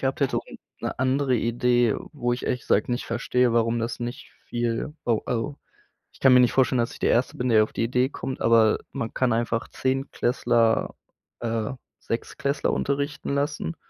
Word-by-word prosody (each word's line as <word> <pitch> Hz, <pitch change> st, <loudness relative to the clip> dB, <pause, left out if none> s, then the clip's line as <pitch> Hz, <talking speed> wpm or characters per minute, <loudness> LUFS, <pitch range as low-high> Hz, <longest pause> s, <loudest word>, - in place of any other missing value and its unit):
gehabt 135 Hz, +2 st, -1 dB
hätte 140 Hz, -, +1 dB
und -, -, -10 dB, 0.2 s
'ne -, -, -3 dB
andere 130 Hz, 0 st, +2 dB
Idee, 120 Hz, 0 st, +2 dB, 0.2 s
wo 120 Hz, -4 st, -1 dB
ich 120 Hz, -, -3 dB
ehrlich 125 Hz, -, -1 dB
gesagt 105 Hz, -, +1 dB
nicht 120 Hz, 0 st, -1 dB
verstehe, 125 Hz, -1 st, +1 dB
warum 115 Hz, 0 st, +2 dB
das 115 Hz, 0 st, -3 dB
nicht 120 Hz, +4 st, -6 dB, 0.2 s
viel 120 Hz, +4 st, -2 dB
wo 115 Hz, -3 st, +2 dB
also 125 Hz, +5 st, -2 dB, 0.5 s
ich -, -, -21 dB
kann 130 Hz, -1 st, +7 dB
mir 125 Hz, -, +8 dB
nicht 125 Hz, -2 st, +4 dB
vorstellen, 130 Hz, -1 st, +3 dB
dass 115 Hz, -, 0 dB
ich -, -, -12 dB
der -, -, +2 dB
Erste 120 Hz, +2 st, +1 dB
bin, 125 Hz, 0 st, -1 dB
der 110 Hz, -1 st, +6 dB
auf 110 Hz, -, -6 dB
die -, -, -1 dB
Idee 125 Hz, +2 st, +1 dB
kommt, 135 Hz, -2 st, -5 dB
aber 115 Hz, -2 st, +4 dB
man 115 Hz, -, -4 dB
kann 130 Hz, -3 st, +1 dB
einfach 115 Hz, 0 st, -1 dB
Zehntklässler, 125 Hz, -3 st, 0 dB, 0.4 s
äh, 115 Hz, -2 st, -2 dB, 0.3 s
Sechstklässler 140 Hz, +4 st, -2 dB
unterrichten 140 Hz, 0 st, -2 dB
lassen. 145 Hz, +3 st, -2 dB
120 Hz, 180 wpm, -25 LUFS, 115-130 Hz, 0.5 s, mir